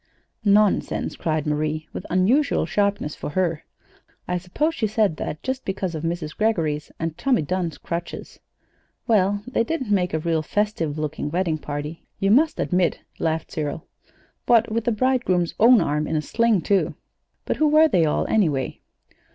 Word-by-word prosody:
"Nonsense!" 205 -1 +2
cried 155 -2 -1
Marie, 155 +1 -1
with - - -6
unusual 235 - +2
sharpness 200 -7 0
for - - -5
her. 170 -1 -1 0.6
"I 180 0 -1
suppose 295 - -1
she 225 -9 -1
said 210 -6 +1
that 150 - -5
just 260 0 -3
because 190 -2 -3
of 155 - -4
Mrs. 165 -2 -3
Greggory's 160 -9 0
and 165 -1 -3
Tommy 260 - +2
Dunn's 175 0 -2
crutches." 170 0 -6 0.7
"Well, 205 -2 +2
they 250 -2 0
didn't 260 -4 -3
make 180 -4 +1
a - - +2
real 160 0 0
festive 165 -4 -1
looking 155 -1 -3
wedding 165 -1 0
party, 150 +2 -6
you 195 0 +1
must 305 +8 +3
admit," 180 -2 +1 0.2
laughed 160 0 -1
Cyril; 150 +1 -4 0.6
"what 230 -1 +4
with 230 +1 -1
the 240 - +2
bridegroom's 215 -7 +1
own 235 -1 +7
arm 150 -1 0
in - - -2
a 155 - +1
sling, 230 -2 +2
too! 195 +4 +1 0.5
But - - -1
who 310 - +3
were 310 +2 +6
they 180 - +3
all, 150 - +1
anyway?" 150 -12 0
180 Hz, 165 wpm, -23 LUFS, 155-220 Hz, 0.7 s, own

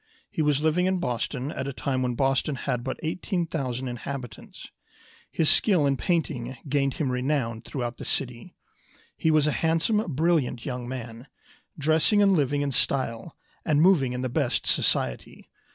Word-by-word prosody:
He - - -1
was 150 -1 +2
living 170 +4 +2
in 190 0 +1
Boston 130 -3 -2
at 135 - -4
a 140 - -3
time 130 0 -1
when 125 -1 -1
Boston 135 +2 +1
had 125 -2 -2
but 130 - -4
18,000 155 -7 -2
inhabitants. 125 -2 -7 0.6
His 160 - 0
skill 180 -5 +4
in 140 -1 +2
painting 135 -6 -1
gained 140 -1 +1
him 140 -5 -1
renown 125 -3 -1
through 135 - -5
out 120 0 -4
the - - -8
city. 125 -3 -3 0.6
He 160 - 0
was 155 -2 +4
a 150 - +2
handsome, 165 +8 +1
brilliant 150 -7 +1
young 125 -2 -4
man, 120 0 -7 0.5
dressing 160 +7 +3
and 200 -1 +5
living 145 -3 +1
in 140 - -1
style, 125 +1 -1 0.3
and 150 -2 +2
moving 155 -7 +4
in 125 +1 -3
the - - 0
best 130 0 0
society. 60 -1 -1
140 Hz, 165 wpm, -26 LUFS, 125-155 Hz, 0.6 s, and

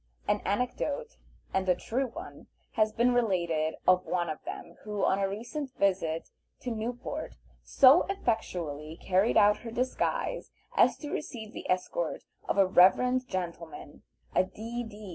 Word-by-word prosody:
An - - +1
anecdote, 250 - -2 0.4
and 190 -1 0
a 180 - +5
true 255 +8 -2
one, 230 - -10 0.2
has 215 -1 +2
been 240 +3 +2
related 170 -9 +1
of 185 0 +5
one 175 -3 -1
of 155 - -8
them - - -7
who, 210 -1 -1
on 190 - +2
a 195 -1 +1
recent 245 +7 -5
visit 180 -5 0 0.3
to 250 - -3
Newport, 245 +6 -4 0.3
so 275 +5 +6
effectually 170 - -2
carried 190 +4 +2
out 210 0 +6
her 235 - -8
disguise 250 +3 -1 0.3
as - - +4
to 295 -1 -7
receive 220 -7 -5
the - - -8
escort 185 - -1 0.3
of - - +1
a 195 - +6
reverend 250 +8 +4
gentleman, 175 -5 -6 0.3
a - - +4
D.D. 220 0 -7
210 Hz, 145 wpm, -29 LUFS, 185-245 Hz, 0.4 s, so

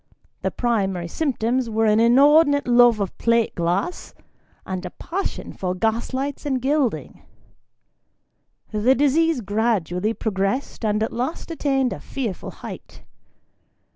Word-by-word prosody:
The - - 0
primary 195 -7 -1
symptoms 250 - -1
were 225 0 +1
an 215 0 +4
inordinate 285 +5 +5
love 240 -2 +5
of 195 -3 -3
plate 230 -1 +2
glass, 180 - -2 0.5
and 185 -1 -4
a 180 - -5
passion 380 - -5
for 180 -1 -3
gas 225 +4 -1
lights 270 +2 -3
and 270 -3 -1
gild 270 -1 +1
ing. - - -12 1.5
The 220 +5 +3
disease 290 +1 +2
gradually 210 -1 0
progressed, 200 +5 -2
and 210 0 +1
at 220 - -3
last 260 +8 -4
attained 270 -5 0
a - - -8
fearful 235 -9 -5
height. - - -10
235 Hz, 130 wpm, -22 LUFS, 210-270 Hz, 1.5 s, inordinate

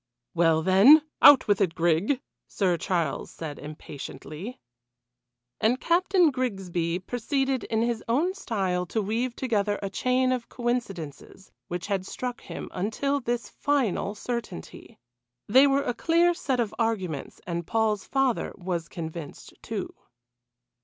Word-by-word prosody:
"Well, 165 -2 +3
then 205 - +7 0.2
out 280 -4 +8
with 205 -1 +2
it, 180 -4 +1
Grig," 175 - +2 0.3
Sir 185 -4 +1
Charles 170 -5 -1
said 155 -3 -7
impatiently. 150 - -8 1.0
And 240 +4 +2
Captain 355 -1 +3
Grigsby 190 -9 -2
proceeded 260 +6 -1
in 225 0 0
his 235 -1 -1
own 300 +11 +1
style 190 - -2
to 220 - -1
weave 230 +4 -1
together 210 -5 0
a 195 -1 -4
chain 255 +3 +1
of 250 -2 -2
coincidences 195 - -4 0.2
which 175 -1 -4
had 195 -2 -2
struck 250 -1 -5
him, - - -7
until 225 +9 -1
this 240 -2 -2
final 255 -8 0
certainty. 235 - -6 0.5
They 260 +7 +6
were 275 0 +2
a 245 - -1
clear 340 +6 +3
set 270 -7 -2
of 230 -3 0
arguments, 190 -11 -2
and 170 -1 -4
Paul's 220 -2 0
father 270 -3 0
was 175 -3 -3
convinced, 160 -2 -7
too. - - -5
220 Hz, 130 wpm, -26 LUFS, 180-255 Hz, 1.0 s, out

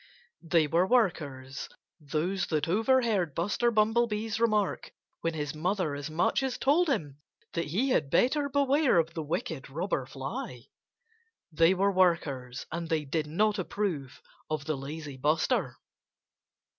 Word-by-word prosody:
They 165 -1 +3
were 170 +5 +2
workers 145 - 0 0.3
those 170 +5 -2
that 155 -2 0
overheard 215 - +2
Buster 205 +7 +1
Bumblebee's 220 0 +1
remark 215 -4 +1 0.3
when 165 -1 -2
his 150 -1 -3
mother 175 0 -1
as 145 +1 -5
much 160 - +1
as 265 -2 -2
told 315 +5 +3
him 150 - -2 0.3
that 170 - -1
he 205 - 0
had 145 - +1
better 280 - +2
beware 280 - +3
of 165 0 +1
the 165 - -3
wicked 155 -3 -4
Robber 150 -3 -2
Fly. 130 -3 -6 0.9
They 165 +4 +4
were 200 +2 +2
workers; 150 -9 +1
and 165 0 -4
they 155 -2 0
did 150 +2 -1
not 205 +6 +1
approve 175 -8 -3 0.3
of 155 -2 -2
the 155 -1 -1
lazy 140 +1 -7
Buster. 150 +4 +1
170 Hz, 140 wpm, -29 LUFS, 150-210 Hz, 0.9 s, They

